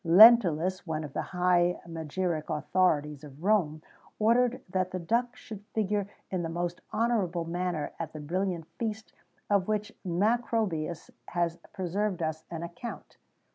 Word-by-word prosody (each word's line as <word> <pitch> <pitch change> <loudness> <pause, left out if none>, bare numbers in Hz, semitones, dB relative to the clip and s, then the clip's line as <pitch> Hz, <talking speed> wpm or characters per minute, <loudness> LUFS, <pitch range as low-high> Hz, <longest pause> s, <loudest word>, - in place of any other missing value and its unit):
Lentulus, 185 -2 +7
one 160 -1 -2
of 145 -3 -7
the - - -1
high 180 -1 +2
magiric 165 0 -2
authorities 150 -2 +1
of 145 +2 -12
Rome, 170 -7 +2 0.3
ordered 240 +3 +3
that 185 0 0
the 185 - -3
duck 235 +8 0
should 210 -3 -9
figure 205 -2 0 0.2
in 185 -2 0
the 165 - -3
most 175 +1 -3
honourable 200 -8 +1
manner 175 -2 -2
at 165 - -4
the 155 - -8
brilliant 175 +2 -2
feast 220 -1 -3 0.3
of 200 -3 +2
which 210 -1 -1
Macrobius 195 -3 0 0.2
has 170 -1 0
preserved 190 -1 -1
us 160 0 -3
an 165 -1 -5
account. 175 +8 -8
180 Hz, 140 wpm, -29 LUFS, 165-210 Hz, 0.3 s, Lentulus